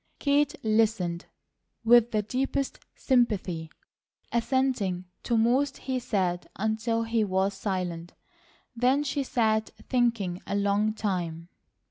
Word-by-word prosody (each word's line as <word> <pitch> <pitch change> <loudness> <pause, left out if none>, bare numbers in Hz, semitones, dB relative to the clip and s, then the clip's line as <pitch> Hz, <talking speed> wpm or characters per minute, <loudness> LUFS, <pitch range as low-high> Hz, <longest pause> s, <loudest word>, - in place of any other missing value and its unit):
Kate 285 0 +2
listened 215 -6 +1 0.6
with 240 0 +6
the 215 -2 0
deepest 270 +4 -2 0.2
sympathy, 200 - +1 0.6
assenting 235 -7 0 0.2
to 235 - 0
most 250 +6 +2
he 260 -1 -2
said 190 -7 -1
until 220 +2 0
he 225 -1 +1
was 190 0 +1
silent. 180 -4 -4 0.6
Then 255 +5 +2
she 285 0 -1
sat 220 -4 +1 0.2
thinking 230 -8 +1
a - - -1
long 205 +2 +1
time. 175 -5 -3
220 Hz, 110 wpm, -27 LUFS, 190-245 Hz, 0.6 s, with